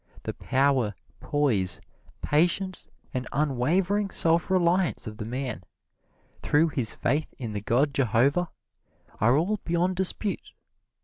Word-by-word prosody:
The - - -4
power, 130 -5 +1 0.2
poise, 115 -12 +1 0.4
patience 180 +5 +1 0.3
and 125 -1 -3
unwavering 170 +9 +1
self 165 -1 +2
reliance 180 -1 +2
of 105 -2 -7
the 105 - -5
man, 125 -4 -4 0.8
through 160 +3 +3
his 130 -7 0
faith 145 +5 -1
in 115 -4 -5
the 105 - -3
god 135 +7 +1
Jehovah, 135 - +2 0.7
are 120 +5 +4
all 195 +7 +1
beyond 175 +2 0
dispute. 190 +2 -1
145 Hz, 120 wpm, -26 LUFS, 125-175 Hz, 0.8 s, are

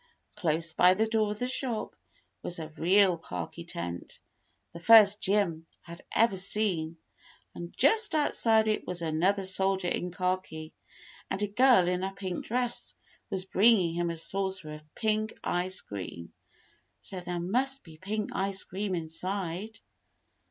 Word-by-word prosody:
Close 165 -4 0
by 180 +2 +5
the 220 +3 +2
door 220 -1 +1
of 210 - -4
the 245 - -2
shop 250 -3 -2 0.5
was 175 - -3
a 160 -2 -6
real 180 +2 +3
khaki 90 - -6
tent, 85 0 -6 0.5
the 170 - -8
first 210 +1 +7
Jim 185 -5 +1
had 170 +1 -11
ever 225 -4 +4
seen, 185 -5 -1 0.6
and 170 0 -7
just 440 -5 +3
outside 225 -7 +3
it 215 -1 -1
was 175 -1 -3
another 180 +5 +1
soldier 190 -1 0
in 180 - -2
khaki, 180 -3 -3 0.6
and 200 - -1
a - - +1
girl 235 -3 +5
in 180 0 0
a 190 - -2
pink 185 -3 -4
dress 245 +1 -2 0.3
was 185 -1 -2
bringing 195 -3 +4
him 175 0 -1
a 170 - -4
saucer 190 -1 -3
of 150 0 -13
pink 215 -1 0
ice 185 +1 -1
cream, 90 -4 -8 0.7
so 190 - -6
there 175 -1 -4
must 260 +10 0
be 160 -2 -14
pink 210 +3 -3
ice 195 0 -1
cream 195 0 -3
inside. 180 +5 -4
190 Hz, 150 wpm, -29 LUFS, 170-215 Hz, 0.7 s, first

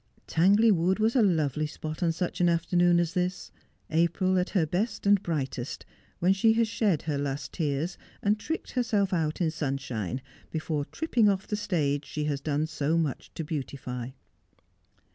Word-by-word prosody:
Tangley 200 +7 +4
Wood 185 0 +2
was 220 +3 +2
a 250 - +5
lovely 155 - +2
spot 155 +1 -6
on 170 -2 +3
such 175 +2 -3
an 175 - +5
afternoon 175 +1 +3
as 170 -1 0
this 180 -1 -2 0.2
— - - -40
April 180 +3 +2
at 180 - -1
her 180 -6 +2
best 190 +10 -2
and 200 -1 +5
brightest, 140 -7 -3 0.3
when 180 +2 +3
she 220 +3 +4
has 230 0 +2
shed 210 -8 +1
her 145 -2 -1
last 140 -1 -3
tears, 155 +2 -2 0.2
and 210 +1 +2
tricked 320 +9 -4
herself 215 -6 +1
out 160 -1 0
in 165 -2 +2
sunshine, 135 - -3 0.3
before 155 -2 -2
tripping 240 - +2
off 195 -1 0
the 210 - -2
stage 150 -8 0
she 150 - -4
has 145 -2 -1
done 150 +1 0
so 160 0 0
much 155 -5 -2
to 165 - -3
beautify. 130 -5 -5
170 Hz, 175 wpm, -28 LUFS, 150-195 Hz, 0.3 s, a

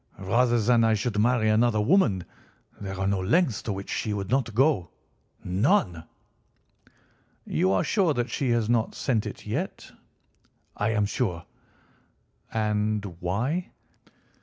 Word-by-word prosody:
Rather 120 +5 +2
than 115 +1 +3
I 110 -1 +3
should 105 0 -2
marry 115 0 +2
another 110 0 +3
woman, 105 - +2 0.5
there 95 -2 -6
are 95 - 0
no 100 0 +1
lengths 120 - +1
to 110 - -4
which 100 0 -6
she 105 - -2
would 100 -1 -4
not 130 -5 0
go—none." 105 - 0 1.4
"You 95 - +1
are 95 -2 +2
sure 185 -8 +1
that 120 0 -2
she 135 - -1
has 120 -2 +1
not 115 -1 0
sent 115 -5 -1
it - - -9
yet?" - - -4 0.8
"I 105 - 0
am 105 -2 +1
sure." 100 -5 -2 1.1
"And 105 -1 0
why?" 120 - -2
110 Hz, 135 wpm, -26 LUFS, 100-125 Hz, 1.4 s, than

